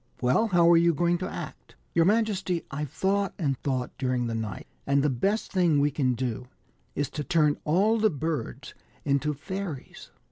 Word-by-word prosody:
" - - -37
Well, 130 - +3
how 175 -4 +4
are 170 - +7
you 170 -1 +3
going 175 +2 +1
to 185 - -3
act - - -8
?" - - -40
"Your 165 -1 +4
majesty, 195 -4 +1
I've 150 +1 -4
thought 195 +5 0
and 140 -7 0
thought 130 -3 -2
during 125 -2 0
the 115 - -2
night, 110 -2 -4 0.2
and 140 0 +3
the 150 - +2
best 195 - -1
thing 175 -6 +3
we 145 +1 +2
can 130 -3 0
do 125 0 -3 0.5
is 145 0 0
to 150 - -4
turn 150 -2 +2
all 200 +8 +3
the 215 0 +4
birds 150 - -4 0.3
into 145 +1 +1
fairies." 170 -1 -7
150 Hz, 190 wpm, -27 LUFS, 135-185 Hz, 0.5 s, are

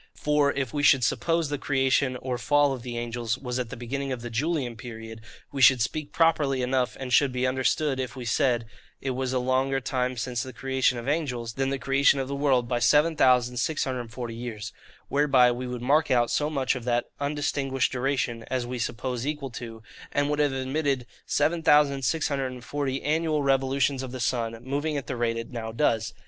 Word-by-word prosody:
For, 150 -1 +2
if 135 -4 -3
we 145 - -1
should 135 -3 +5
suppose 165 +6 +1
the 145 -1 -2
creation, 135 -1 +1
or 125 -2 -2
fall 145 +1 +3
of 130 - -6
the 120 -1 -6
angels, 120 -1 -2
was 125 -1 -4
at 125 -2 -3
the - - -7
beginning 135 +3 -4
of 125 -2 -4
the 120 - -6
Julian 135 -1 -1
period, 115 -1 -9 0.3
we 140 -2 -3
should 130 -1 +7
speak 145 +5 -2
properly 145 -6 +2
enough, 125 0 0
and 130 -2 -4
should 140 0 +5
be 125 0 -1
understood 130 +2 +1
if 130 +1 -4
we 125 -2 -7
said, 120 0 +1 0.3
it 135 - -2
is 130 0 -2
a 130 - 0
longer 130 +2 +1
time 125 -1 -2
since 120 +1 -2
the 130 0 -7
creation 130 -2 0
of 120 +2 -6
angels 125 -7 -1
than 135 +1 -1
the 140 - -1
creation 135 +2 +3
of 135 - -2
the 140 - -4
world, 135 -4 +2
by 120 0 0
7640 125 -4 +2
years: 115 -3 -6 0.3
whereby 135 -4 +4
we 125 +1 -4
would 125 -1 -5
mark 150 +4 +3
out 120 -2 +3
so 150 0 +1
much 135 -4 0
of 125 - -6
that 120 0 0
undistinguished 140 -3 -1
duration 125 -3 -1
as 130 -2 -1
we 125 0 -5
suppose 125 +2 -3
equal 145 -3 -3
to, 115 -2 -8 0.3
and 145 +1 +1
would 150 - -1
have 145 -2 +3
admitted, 135 0 -1 0.2
7640 140 -3 +1
annual 155 0 +1
revolutions 135 0 +1
of 130 -2 -6
the 130 - -6
sun, 115 -2 -1
moving 145 +3 -2
at 140 - -4
the 130 - -4
rate 115 -1 0
it 115 +2 -6
now 115 -2 -5
does. 110 -3 0
130 Hz, 190 wpm, -26 LUFS, 120-140 Hz, 0.3 s, should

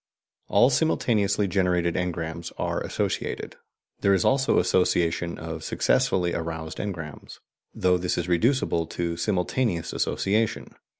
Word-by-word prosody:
All 125 +3 +4
simultaneously 110 -8 +2
generated 90 -2 +1
engrams 85 -1 -3
are - - -1
associated; - - -3 0.4
there 100 0 +4
is 95 - +1
also 135 0 +3
association 85 -2 +1
of 80 0 -6
successively 90 -2 +1
aroused 80 -1 -4
engrams, 80 -8 -6 0.4
though 90 -1 +2
this 90 0 -1
is 85 - -2
reducible 90 - +1
to 85 -1 -3
simultaneous 90 +1 -1
association. 105 +3 0
90 Hz, 115 wpm, -25 LUFS, 85-100 Hz, 0.4 s, All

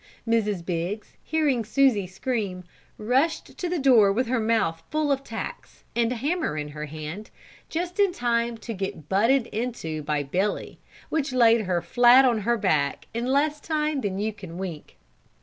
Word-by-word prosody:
Mrs. 210 -6 +1
Biggs, 180 +4 -3
hearing 295 -7 +1
Susie 225 -4 +2
scream, 190 -2 -3 0.3
rushed 260 +9 0
to 360 - -2
the 355 - 0
door 245 -8 +5
with 245 +6 +1
her 250 +1 0
mouth 220 -8 +1
full 305 -1 0
of 275 0 0
tacks, 225 -3 -7
and 235 0 +2
a - - -1
hammer 290 - -1
in 150 0 -4
her 150 +1 -6
hand, 155 +7 -7 0.4
just 355 +4 -3
in 400 -2 +4
time 235 -4 0
to 225 +1 -6
get 190 -6 -5
butted 230 +6 +3
into 215 -9 -3
by 150 0 -1
Billy, 185 +9 -2 0.3
which 290 -4 -1
laid 230 -2 +5
her 175 -2 0
flat 245 +2 +6
on 240 -4 +3
her 235 +3 +1
back 145 -8 0
in 235 +2 -2
less 295 +3 +1
time 305 -2 -1
than 195 -4 -2
you 215 +2 -1
can 185 -5 -10
wink. 180 -5 -7
230 Hz, 170 wpm, -25 LUFS, 190-265 Hz, 0.4 s, flat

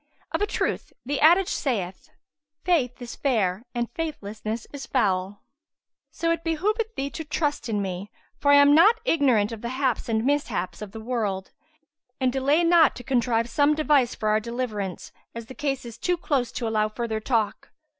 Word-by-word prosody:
Of - - -1
a 415 - +2
truth - - -2
the 280 +2 -2
adage 345 +4 +6
saith, 195 -10 -3 0.5
'Faith 295 -9 +1
is 245 -1 -7
fair 215 -6 0
and 240 0 0
faithlessness 220 -8 -5
is 280 -1 -7
foul.'[FN#162] 195 -5 0 0.7
So 335 0 -1
it 335 0 -1
behoveth 420 +8 -1
thee 275 +1 -3
to 320 - -5
trust 295 -4 -2
in 205 -2 0
me, 190 +1 -5 0.3
for 285 - +1
I - - +8
am 285 0 +7
not 420 +9 +6
ignorant 255 - +3
of 225 -2 -7
the 235 - -4
haps 260 -2 -1
and 220 0 0
mishaps 270 -11 -1
of 210 -2 -7
the 220 - -8
world; 215 -5 -2 0.7
and 255 -2 +1
delay 280 +5 +2
not 335 -3 +5
to 245 - -9
contrive 235 -3 +1
some 290 +5 +3
device 295 -5 +2
for 215 - -1
our 215 0 +3
deliverance, 220 -5 -4 0.2
as 230 -1 -6
the 260 - -10
case 275 -2 -2
is 230 -1 -9
too 355 +5 0
close 280 -8 -1
to 235 - -3
allow 215 -1 +1
further 220 0 -3
talk." 220 -2 -1
250 Hz, 180 wpm, -25 LUFS, 220-290 Hz, 0.7 s, I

